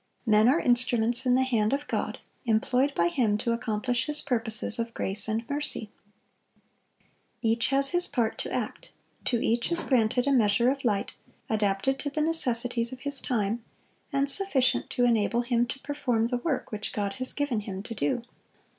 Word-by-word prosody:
Men 215 Hz, 0 st, +4 dB
are 295 Hz, +6 st, +3 dB
instruments 240 Hz, -1 st, +1 dB
in 250 Hz, -, +4 dB
the 260 Hz, -, +3 dB
hand 230 Hz, -3 st, 0 dB
of 290 Hz, +1 st, -2 dB
God, -, -, -3 dB, 0.3 s
employed 250 Hz, +5 st, +1 dB
by 170 Hz, -, +2 dB
Him 210 Hz, +1 st, +1 dB
to 235 Hz, -, -1 dB
accomplish 230 Hz, +2 st, -1 dB
His 300 Hz, 0 st, -1 dB
purposes 230 Hz, -3 st, +2 dB
of 230 Hz, 0 st, -4 dB
grace 200 Hz, +2 st, 0 dB
and 225 Hz, +2 st, -2 dB
mercy. 285 Hz, -7 st, -2 dB, 1.5 s
Each 230 Hz, +1 st, +2 dB
has 275 Hz, 0 st, +5 dB
his 350 Hz, 0 st, +4 dB
part 230 Hz, -3 st, -1 dB
to -, -, -4 dB
act; -, -, -4 dB, 0.4 s
to 240 Hz, -, +1 dB
each 235 Hz, +6 st, 0 dB
is 340 Hz, -, +6 dB
granted 245 Hz, -1 st, +1 dB
a 280 Hz, -, +1 dB
measure 235 Hz, -1 st, +3 dB
of 275 Hz, 0 st, -5 dB
light, 205 Hz, -5 st, -1 dB, 0.4 s
adapted 210 Hz, +5 st, 0 dB
to 290 Hz, -, -3 dB
the 305 Hz, +2 st, -2 dB
necessities 245 Hz, -7 st, 0 dB
of 255 Hz, -1 st, -9 dB
his 285 Hz, -1 st, -1 dB
time, 225 Hz, -1 st, -2 dB, 0.5 s
and 275 Hz, -1 st, +1 dB
sufficient 280 Hz, -6 st, +2 dB
to 245 Hz, -, +1 dB
enable 235 Hz, 0 st, +2 dB
him 240 Hz, 0 st, 0 dB
to 260 Hz, -, -5 dB
perform 255 Hz, -6 st, -1 dB
the 245 Hz, -, -1 dB
work 270 Hz, +2 st, -3 dB
which 215 Hz, -1 st, -4 dB
God 200 Hz, -1 st, -2 dB
has 255 Hz, -, +4 dB
given 285 Hz, -6 st, -1 dB
him 195 Hz, -2 st, -6 dB
to 230 Hz, -, -7 dB
do. 195 Hz, +3 st, -1 dB
240 Hz, 180 wpm, -27 LUFS, 220-270 Hz, 1.5 s, is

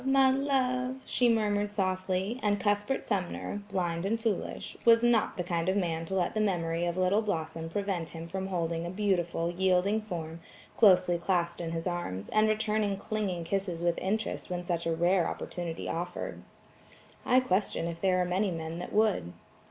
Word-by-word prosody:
my 270 Hz, 0 st, +5 dB
love!" 260 Hz, -1 st, 0 dB
she 245 Hz, -1 st, +2 dB
murmured 210 Hz, -2 st, +1 dB
softly, 190 Hz, +2 st, -1 dB
and 205 Hz, -1 st, +1 dB
Cuthbert 205 Hz, +5 st, 0 dB
Sumner 205 Hz, 0 st, -2 dB
(blind 175 Hz, -3 st, -1 dB
and 220 Hz, +4 st, 0 dB
foolish) 220 Hz, -4 st, -3 dB
was 230 Hz, 0 st, +6 dB
not 240 Hz, -2 st, +3 dB
the 180 Hz, -, -1 dB
kind 170 Hz, 0 st, -1 dB
of 190 Hz, -, +1 dB
man 165 Hz, -3 st, -1 dB
to 190 Hz, -, -3 dB
let 180 Hz, -2 st, +1 dB
the 215 Hz, -, -1 dB
memory 170 Hz, -4 st, 0 dB
of 175 Hz, +1 st, -2 dB
little 185 Hz, +3 st, +3 dB
Blossom 165 Hz, -5 st, -3 dB
prevent 185 Hz, -3 st, -2 dB
him 165 Hz, +1 st, -7 dB
from 190 Hz, +2 st, -4 dB
holding 170 Hz, -3 st, -1 dB
a 170 Hz, -, -4 dB
beautiful, 175 Hz, -3 st, 0 dB
yielding 190 Hz, +4 st, +2 dB
form 170 Hz, -5 st, -6 dB, 0.4 s
closely 180 Hz, -5 st, +5 dB
clasped 170 Hz, -1 st, 0 dB
in 165 Hz, -, -3 dB
his 165 Hz, 0 st, -3 dB
arms, 175 Hz, -, -3 dB
and 215 Hz, 0 st, +3 dB
returning 215 Hz, -2 st, +1 dB
clinging 200 Hz, -5 st, -2 dB
kisses 180 Hz, -2 st, -2 dB
with 175 Hz, -1 st, +1 dB
interest 215 Hz, +3 st, -2 dB
when 180 Hz, -1 st, -3 dB
such 170 Hz, -1 st, -2 dB
a -, -, +1 dB
rare 175 Hz, +2 st, +3 dB
opportunity 170 Hz, -2 st, -5 dB
offered. 170 Hz, +2 st, -4 dB, 0.8 s
I 255 Hz, -, +5 dB
question 195 Hz, -7 st, 0 dB
if 170 Hz, 0 st, -5 dB
there 185 Hz, -1 st, +3 dB
are -, -, -1 dB
many 190 Hz, +3 st, +1 dB
men 165 Hz, -1 st, -4 dB
that 180 Hz, -, -6 dB
would. 205 Hz, -, +2 dB
185 Hz, 175 wpm, -30 LUFS, 170-210 Hz, 0.8 s, was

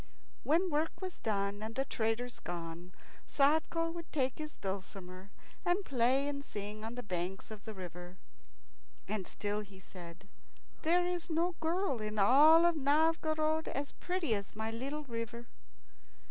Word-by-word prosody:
When 345 Hz, +4 st, +2 dB
work 305 Hz, +2 st, 0 dB
was 370 Hz, -1 st, -5 dB
done 200 Hz, -1 st, -1 dB
and 220 Hz, +1 st, -5 dB
the 270 Hz, -, +1 dB
traders 235 Hz, 0 st, -1 dB
gone, 170 Hz, +1 st, -6 dB, 0.4 s
Sadko 320 Hz, +3 st, +3 dB
would 335 Hz, -1 st, -7 dB
take 265 Hz, -2 st, 0 dB
his 305 Hz, 0 st, -5 dB
dulcimer 190 Hz, -1 st, -6 dB, 0.3 s
and 360 Hz, +3 st, +1 dB
play 260 Hz, +2 st, +3 dB
and 280 Hz, -1 st, -3 dB
sing 210 Hz, -2 st, -5 dB
on 225 Hz, +2 st, -4 dB
the 245 Hz, -, -5 dB
banks 185 Hz, +1 st, -3 dB
of 215 Hz, -1 st, -9 dB
the 220 Hz, -2 st, -6 dB
river. 180 Hz, 0 st, -8 dB, 0.9 s
And 210 Hz, -4 st, -2 dB
still 205 Hz, 0 st, -2 dB
he 200 Hz, -2 st, -12 dB
said, 180 Hz, 0 st, -11 dB, 0.5 s
"There 350 Hz, +2 st, +4 dB
is 350 Hz, -2 st, -2 dB
no 335 Hz, +2 st, +2 dB
girl 325 Hz, -, 0 dB
in 215 Hz, 0 st, -3 dB
all 310 Hz, +11 st, +7 dB
Novgorod 315 Hz, +1 st, +2 dB
as 280 Hz, +1 st, -3 dB
pretty 360 Hz, -9 st, -1 dB
as 200 Hz, -1 st, -3 dB
my 220 Hz, +1 st, -2 dB
little 275 Hz, +6 st, -3 dB
river." 235 Hz, -2 st, -5 dB
245 Hz, 145 wpm, -34 LUFS, 200-315 Hz, 0.9 s, all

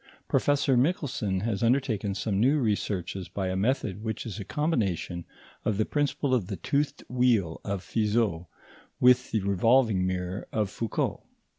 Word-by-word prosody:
Professor 140 Hz, -2 st, +2 dB
Michelson 125 Hz, -, 0 dB
has 105 Hz, -2 st, -1 dB
undertaken 115 Hz, -5 st, +1 dB
some 100 Hz, -1 st, -1 dB
new 135 Hz, +7 st, +4 dB
researches 100 Hz, -5 st, -2 dB
by 95 Hz, -2 st, -2 dB
a 95 Hz, -, -1 dB
method 110 Hz, -1 st, -1 dB
which 110 Hz, +1 st, -3 dB
is 110 Hz, -1 st, -6 dB
a -, -, -4 dB
combination 100 Hz, -, -1 dB, 0.4 s
of 105 Hz, -, 0 dB
the 110 Hz, -, +2 dB
principle 145 Hz, -2 st, 0 dB
of 115 Hz, -8 st, +1 dB
the 100 Hz, -, -3 dB
toothed 140 Hz, -, -1 dB
wheel 120 Hz, -10 st, +1 dB
of 100 Hz, -2 st, -3 dB
Fizeau 105 Hz, -6 st, 0 dB, 0.5 s
with 125 Hz, 0 st, +5 dB
the 110 Hz, -, 0 dB
revolving 100 Hz, 0 st, +3 dB
mirror 90 Hz, +1 st, -3 dB
of 105 Hz, -3 st, -1 dB
Foucault. 115 Hz, -2 st, -2 dB
110 Hz, 150 wpm, -28 LUFS, 95-125 Hz, 0.5 s, with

